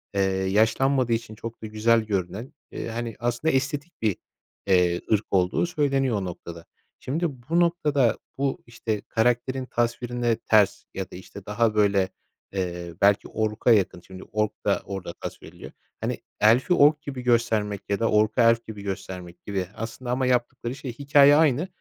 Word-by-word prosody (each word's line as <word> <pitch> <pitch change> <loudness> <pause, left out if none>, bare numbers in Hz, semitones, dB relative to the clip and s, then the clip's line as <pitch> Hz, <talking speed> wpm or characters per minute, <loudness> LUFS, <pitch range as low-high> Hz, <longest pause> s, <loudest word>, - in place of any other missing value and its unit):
eee, 100 - +2
yaşlanmadığı 110 +7 +2
için 115 -1 -3
çok 115 +1 -8
da - - -4
güzel 110 +2 +3
görünen, 100 +2 -3 0.2
eee, - - -5
hani, 115 -1 -4
aslında 120 +7 0
estetik 140 +5 -2
bir, 105 -4 +1 0.5
eee, 90 -2 +3
ırk 105 0 +2
olduğu 90 - +2
söyleniyor 140 -7 +1
o 100 - -3
noktada. 85 -1 -8 0.3
Şimdi 160 +7 -2 0.2
bu 170 +1 +3
noktada 150 -8 +2 0.2
bu, 135 -1 -1
işte, 115 -3 -4
karakterin 125 +3 0
tasvirine 120 -1 -1
ters 105 -3 +2
ya 95 - -5
da, - - -9
işte, 95 +2 -11
daha, 110 +1 +1
böyle, 100 -3 +3 0.4
eee, 90 -3 -3
belki 100 0 +4
ork'a 110 +2 0
yakın, 100 -5 +2
şimdi 95 +1 -11
ork 105 -1 -1
da - - +2
orada 95 -3 -6
tasvir - - -8
ediliyor. - - -11 0.3
Hani, - - -2 0.2
elf'i 120 +11 +4
ork 150 -1 +5
gibi 135 -4 -6
göstermek 115 -4 +1
ya 100 +1 0
da 115 - +1
ork'u 110 +3 +3
elf 115 0 +4
gibi 105 -2 -7
göstermek 90 -3 -7
gibi 95 -2 -2
aslında 115 +2 -5
ama 130 +1 0
yaptıkları 125 0 -1
şey, 130 -3 -6
hikâye 140 0 +6
aynı 155 +1 +3
115 Hz, 160 wpm, -25 LUFS, 100-130 Hz, 0.5 s, hikâye